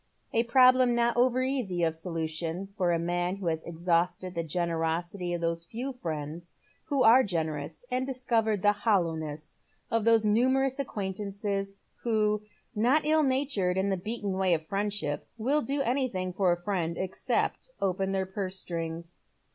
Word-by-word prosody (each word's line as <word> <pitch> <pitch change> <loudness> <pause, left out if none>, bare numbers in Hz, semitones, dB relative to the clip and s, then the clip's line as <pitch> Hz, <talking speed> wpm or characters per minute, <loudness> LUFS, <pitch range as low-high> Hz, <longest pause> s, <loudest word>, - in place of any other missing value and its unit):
A 230 - +4
problem 255 0 +5
not 235 0 +2
over 250 +1 +3
easy 240 -10 -1
of 165 -1 +2
solution 165 +2 -4
for 180 -4 +1
a 170 - +2
man 175 +2 -1
who 195 -2 -7
has 160 -1 -1
exhausted 170 +2 0
the 170 - -1
generosity 170 +2 -2
of 175 -1 -2
those 165 0 -1
few 250 +8 -5
ficiends 165 - -5 0.3
who 280 -4 +1
are 235 +4 +8
generous, 160 - -3
and 255 +1 +1
discovered 235 -6 0
the 205 0 +5
hoUowness 160 -7 -1 0.3
of 230 -1 +2
those 225 -1 +4
numerous 260 +5 +2
acquaintances 200 -3 -3 0.3
who, 215 -2 +1 0.3
not 255 +8 +3
ill 310 +1 +4
natured 260 -10 +1
in 195 +1 +1
the - - +2
beaten 205 +1 -3
way 185 -3 +4
of 160 -1 -5
friendship, 200 -5 -2
will 270 +7 +2
do 280 0 -1
anything 235 -9 -1
for 185 -1 +2
a 175 - 0
fiiend 175 -3 -2
except 190 - -1
open 190 0 0
their 190 -1 0
purse 190 0 -4
strings. 165 -1 -5
195 Hz, 155 wpm, -29 LUFS, 170-235 Hz, 0.3 s, are